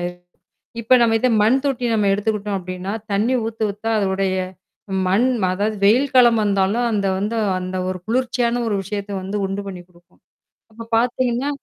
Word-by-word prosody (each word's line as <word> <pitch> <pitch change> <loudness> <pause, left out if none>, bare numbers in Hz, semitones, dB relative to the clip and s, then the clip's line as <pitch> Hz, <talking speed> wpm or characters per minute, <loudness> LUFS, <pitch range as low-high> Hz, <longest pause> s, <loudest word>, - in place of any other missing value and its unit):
ஆயிரும். 175 0 -6 0.6
இப்ப 230 +3 +4
நாம 230 -1 +4
இத 255 - +3
மண் 255 +5 +3
தொட்டி 260 -3 -1
நாம 210 -2 +2
எடுத்துக்கிட்டோம் 205 0 -1
அப்படீன்னா, 185 +1 -5 0.2
தண்ணி 215 +6 +1
ஊத்த, 225 -1 -2
ஊத்த 210 +3 -12
அதனுடைய 190 -1 0 0.7
மண் 205 +7 +3 0.3
அதாவது, 210 +3 -1
வெயில் 255 +7 +3
காலம் 240 -3 +6
வந்தாலும் 200 +4 +1
அந்த 200 -2 0
வந்து 210 +4 -2 0.2
அந்த 185 +1 -4
ஒரு 185 - -4
குளிர்ச்சியான 245 0 0
ஒரு 210 - 0
விஷயத்தை 200 +1 -5
வந்து 195 +2 -4
உண்டு 195 +1 -4
பண்ணி 180 -2 -8
குடுக்கும். 175 -1 -26 0.5
அப்பப் 230 +1 -10
பாத்தீங்கன்னா 250 +2 0
210 Hz, 160 wpm, -20 LUFS, 195-235 Hz, 0.7 s, காலம்